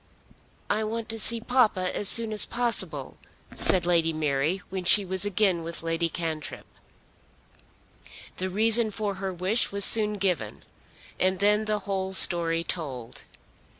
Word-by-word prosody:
"I 215 +1 -1
want 225 +1 -5
to 225 0 -5
see 230 +2 +3
papa 220 -7 0
as 200 - +3
soon 230 -2 +3
as 210 - +2
possible," 190 - -2 0.4
said 180 -2 +1
Lady 170 -2 +1
Mary 155 +3 -2
when 190 -1 -5
she 195 +3 +4
was 190 +1 -1
again 200 -3 0
with 165 0 -6
Lady 165 0 -2
Cantrip. 160 -2 -6 1.7
The 185 +1 -4
reason 220 +3 +3
for 210 -1 -4
her 195 -1 -4
wish 185 +6 0
was 200 0 +2
soon 210 -2 +6
given, 180 - -3 0.6
and 185 0 +1
then 210 +3 +1
the 215 0 -2
whole 190 -1 -4
story 170 -3 +3
told. 130 -9 -7
190 Hz, 145 wpm, -25 LUFS, 170-215 Hz, 1.7 s, soon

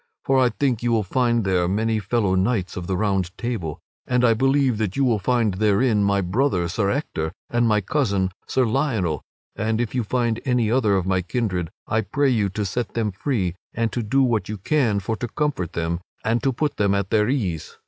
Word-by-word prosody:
For 135 -1 +3
I 125 -1 +4
think 130 -3 0
you 120 0 0
will 110 -2 +2
find 120 +2 +1
there 90 -2 +1
many 110 +3 0
fellow 105 -1 0
knights 95 -1 0
of 90 -1 -5
the 95 - -1
Round 95 -3 0
Table. 110 -11 -3 0.3
And 125 0 +2
I 115 - +5
believe 135 -1 +2
that 105 -4 -1
you 140 - +3
will 115 -4 +2
find 115 0 +1
therein 105 +2 +2
my 100 0 +2
brother, 95 -1 +1
Sir 100 +3 0
Ector, 90 - -2 0.2
and 120 0 +2
my 105 -2 +3
cousin, 100 -6 0 0.2
Sir 130 - +2
Lionel. 110 - 0 0.3
And 110 +1 -1
if 120 -3 -2
you 125 -2 0
find 120 0 0
any 125 -4 +1
other 115 -5 +3
of 90 - -1
my 95 -1 +1
kindred 90 -3 -2 0.2
I 110 - +1
pray 135 +7 +1
you 105 -5 +1
to 105 +2 -3
set 115 +5 -3
them 110 -3 0
free 95 - -1 0.2
and 115 -1 0
to 120 - -2
do 135 +5 +2
what 115 -5 0
you 105 - -3
can 110 -1 +1
for 110 +3 -2
to 120 - -3
comfort 135 - -2
them 85 0 -1 0.3
and 115 +1 +1
to 135 - +1
put 145 +4 -2
them 100 -1 +2
at 100 -1 -2
their 105 0 +3
ease. 95 - -2
110 Hz, 215 wpm, -23 LUFS, 95-125 Hz, 0.3 s, I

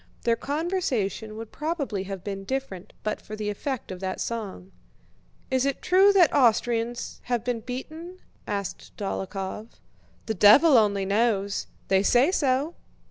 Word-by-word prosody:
Their 230 -1 +3
conversation 265 - -2
would 225 -1 -8
probably 290 - -3
have 195 -2 -6
been 195 -1 -5
different 230 -6 -4
but 215 - -2
for 215 - -8
the 210 -1 -2
effect 260 +3 -4
of 185 - -6
that 185 0 -3
song. 200 -5 -5 0.8
"Is 260 -1 +2
it 275 0 0
true 385 +2 +6
that 360 -5 +5
Austrians 235 -2 +1
have 240 -3 -1
been 245 -1 -1
beaten?" 315 +9 -7 0.3
asked 200 -3 -5
Dólokhov. 195 +1 -4 0.6
"The 220 - -1
devil 220 - +7
only 205 -4 +3
knows! 200 -1 +1 0.2
They 190 0 +3
say 245 - +4
so." 285 -1 +1
230 Hz, 140 wpm, -26 LUFS, 200-270 Hz, 0.8 s, devil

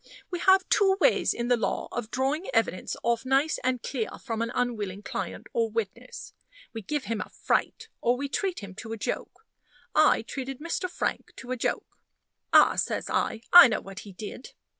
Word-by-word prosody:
We 355 - -2
have 380 +1 +4
two 390 -2 +4
ways - - +3
in 235 0 -3
the 245 - +4
law 230 - -2
of 240 -3 -4
drawing 275 - -1
evidence - - 0
off 235 -1 +1
nice 270 +4 +1
and 255 -2 0
clear 235 -6 -2
from 230 -4 -4
an 230 +1 -1
unwilling 210 -5 -2
client - - -5
or 230 -1 +1
witness. 230 +3 -5 0.4
We 225 - -5
give 290 +7 -3
him 225 -4 -3
a - - -6
fright, - - -1
or 240 +1 +2
we 280 +2 -3
treat 365 - -2
him 200 -2 -9
to 225 0 -6
a - - -5
joke. 445 - -5 0.5
I - - +4
treated 270 -1 -6
Mr. 335 +3 -3
Frank - - -3
to 255 - -9
a - - 0
joke. 240 - -3 0.5
"Ah!" - - +6
says - - -1
I, 225 - 0
"I 350 -7 +12
know 220 - -1
what 195 -1 -9
he 205 - -10
did. 210 +6 -9
245 Hz, 190 wpm, -27 LUFS, 225-280 Hz, 0.5 s, I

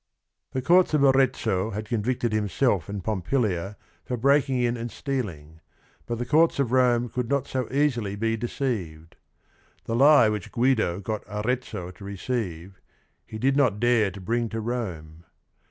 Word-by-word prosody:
The 130 - -2
courts 175 +1 +4
of 145 - +3
Arezzo 125 -7 +2
had 105 0 -5
convicted 120 +1 -1
himself 105 - 0
and 100 -2 -5
Pompilia 105 -1 -1 0.3
for 125 - -3
breaking 135 +1 +2
in 120 -1 +1
and 120 0 -5
stealing, 90 - -5 0.5
but 120 - -2
the 120 - -3
courts 160 +5 +3
of 135 -4 0
Rome 125 -2 +3
could 120 0 -4
not 140 -1 +1
so 130 -3 -3
easily 125 -8 0
be 115 +2 0
de 115 +2 -3
ceived. 85 - -4 0.7
The 115 - -2
lie 140 -1 +6
which 105 -3 -3
Guido 115 -7 +1
got 110 +2 -4
Arezzo 105 -4 -3
to 95 - -14
receive, 100 -3 -5 0.5
he 110 - -7
did 135 +5 +1
not 125 -8 +2
dare 120 -3 +3
to 95 +1 -10
bring 115 +5 -1
to 115 - -4
Rome. 90 -9 -5
115 Hz, 160 wpm, -25 LUFS, 100-130 Hz, 0.7 s, lie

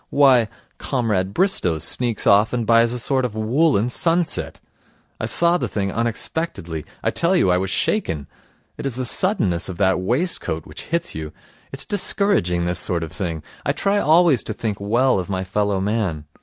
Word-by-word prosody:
Why, 130 -5 +4 0.3
Comrade 105 -8 -1
Bristow 165 - +1
sneaks 120 +7 -1
off 105 +3 +4
and 120 -2 -1
buys 115 +1 +4
a 125 - -3
sort 130 +2 0
of 120 -4 -3
woollen 115 +1 +2
sunset. 170 +4 +1 0.6
I - - -2
saw 170 +1 +3
the - - -2
thing 100 -2 -2
unexpectedly. 115 - -3 0.2
I - - +1
tell 170 +3 +1
you 95 - +3
I 90 - +2
was 95 0 -2
shaken. 80 - -1 0.5
It - - -2
is 130 - -4
the 130 0 -3
suddenness 105 - +1
of 90 - -6
that 95 -2 +2
waistcoat 115 - -1
which 75 - -9
hits 170 +1 -2
you. 80 -1 -6 0.4
It's 135 - -4
discouraging, 180 - +1
this 90 0 +1
sort 85 -1 +1
of 80 - -7
thing. 85 -5 -4 0.2
I - - 0
try 200 +1 0
always 160 - +4
to 110 - -3
think 105 -2 -4
well 115 +3 +2
of 90 - -5
my 95 -1 -2
fellow 100 +1 -1
man. 95 -7 -2
110 Hz, 180 wpm, -21 LUFS, 95-140 Hz, 0.6 s, Why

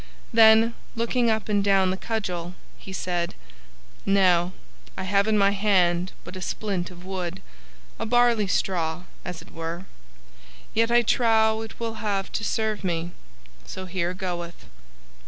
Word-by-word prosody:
Then, 225 0 +7 0.2
looking 235 +1 +1
up 220 -1 0
and 205 -2 +2
down 195 -2 +3
the - - -1
cudgel, 180 -5 -3 0.2
he 190 - -11
said, 175 -2 -2 0.7
"Now, 185 -3 +3 0.5
I 190 - -3
have 200 +2 +2
in 215 -1 +3
my 200 0 +4
hand 185 -3 +2
but 180 +2 -9
a 185 - -6
splint 190 -2 -2
of 180 0 -13
wood 185 -2 -4 0.6
a - - -2
barley 240 -3 +3
straw, 175 -3 0 0.2
as 180 -2 -6
it - - -18
were 165 +3 -5 0.9
yet 230 +1 +3
I 240 0 +5
trow 220 -1 +3
it 225 - -9
will 225 -1 -4
have 200 -3 -1
to - - -2
serve 220 -2 -1
me, 170 -1 -2 0.5
so 185 - -7
here 180 -1 -2
goeth." 175 - -5
195 Hz, 150 wpm, -25 LUFS, 180-220 Hz, 0.9 s, Then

